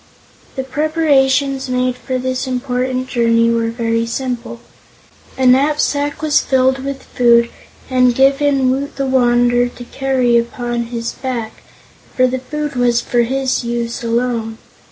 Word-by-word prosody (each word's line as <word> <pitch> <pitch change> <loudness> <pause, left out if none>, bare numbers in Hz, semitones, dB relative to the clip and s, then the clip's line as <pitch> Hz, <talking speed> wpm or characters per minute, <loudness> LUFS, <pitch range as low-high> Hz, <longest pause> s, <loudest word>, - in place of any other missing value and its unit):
The 265 - -3
preparations 275 -2 +1
made 250 0 0
for 255 +1 -4
this 255 +1 -3
important 255 0 -2
journey 230 -2 +2
were 230 0 0
very 230 0 -1
simple. 240 -1 -4 0.8
A 260 - 0
knapsack 285 +2 +2
was 305 -1 +3
filled 260 0 +2
with 275 0 -5
food 235 -1 +3 0.4
and 250 -2 +3
given 275 0 +3
Woot 275 +2 -3
the 275 - -2
Wanderer 245 -1 +2
to 245 - -11
carry 255 -2 +1
upon 240 0 -3
his 230 0 -4
back, 240 -4 -5 0.5
for 255 - +4
the 255 +1 -1
food 295 +2 -5
was 245 -1 +2
for 240 - -1
his 260 +2 -1
use 235 0 -3
alone. 230 -1 -1
255 Hz, 135 wpm, -17 LUFS, 235-270 Hz, 0.8 s, for